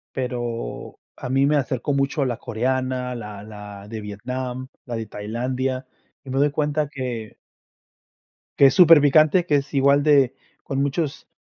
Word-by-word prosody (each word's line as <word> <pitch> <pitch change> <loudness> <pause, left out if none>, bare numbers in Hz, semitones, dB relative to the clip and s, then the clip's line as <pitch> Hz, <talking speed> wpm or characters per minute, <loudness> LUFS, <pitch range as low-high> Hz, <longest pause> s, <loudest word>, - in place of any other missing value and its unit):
Pero 120 - -4 0.2
a - - -7
mí 135 +1 +3
me 150 +2 +3
acercó 130 +1 -1
mucho 140 +1 0
la 120 -3 -2
coreana, 125 +1 -2
la 105 -3 -8
la 105 -1 -10
de 110 0 -6
Vietnam, 125 +5 -5 0.2
la 120 - -5
de 115 -1 -4
Tailandia, 130 +5 -3 0.4
y 135 - -12
me 130 - -2
doy 145 +1 +3
cuenta 150 0 -1
que 125 -6 -5 1.2
que 140 - +7
es - - +3
superpicante, 155 -1 +6
que 150 - +2
es 140 +1 -1
igual 140 +1 +4
de 140 -4 +4 0.3
con 135 0 -2
muchos 140 +2 -2
130 Hz, 155 wpm, -23 LUFS, 120-140 Hz, 1.2 s, que